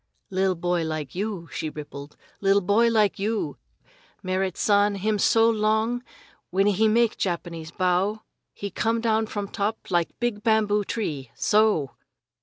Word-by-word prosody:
"Li'l 190 0 +1
boy 175 0 0
like 155 -4 -4
you!" 195 -3 -4
she 155 - -3
rippled, 145 -1 -9 0.2
"li'l 195 0 +4
boy 205 +5 +3
like 215 -4 +2
you! 215 +2 -2 0.7
Merrit 185 -1 -1
San 205 0 +3
him 210 +2 0
so 225 +3 +4
long 220 +2 +1 0.5
when 195 +2 +2
he 205 +2 +3
make 230 +1 +2
Japanese 170 -3 -3
bow 185 +4 0 0.3
he 200 -1 -6
come 225 +4 0
down 220 -1 +1
from 205 -2 -4
top 205 +1 -3
like 175 -2 0
big 240 -3 -1
bamboo 210 -2 +2
tree 150 - -4
so!" 210 - +2
205 Hz, 145 wpm, -25 LUFS, 180-220 Hz, 0.7 s, li'l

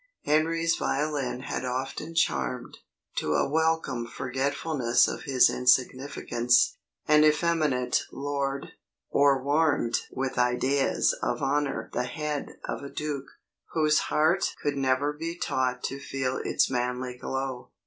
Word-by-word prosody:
Henry's 165 +2 +2
violin 140 -3 -1
had 130 - -4
often 135 +6 -4
charmed, 65 - -1 0.4
to 75 0 0
a - - +2
welcome 160 -5 0
forgetfulness 130 -1 +1
of - - -5
his 135 -4 +5
insignificance, 125 -1 +2 0.3
an 150 0 +6
effeminate 155 -4 +2
lord; 140 -1 -3 0.4
or 140 -2 +4
warmed 145 -5 +2
with 130 -1 -2
ideas 130 +3 +2
of - - -1
honour 140 +1 -1
the 125 - 0
head 150 +1 -4
of - - -4
a 140 - -7
duke, 145 -2 -4 0.5
whose 155 -1 +3
heart 160 +5 +2
could 145 -1 -1
never 135 +2 +1
be 165 +3 -5
taught 125 -5 -1
to 135 - -3
feel 135 -2 -2
its - - +1
manly 125 0 -2
glow. 130 0 -4
135 Hz, 125 wpm, -27 LUFS, 125-150 Hz, 0.5 s, an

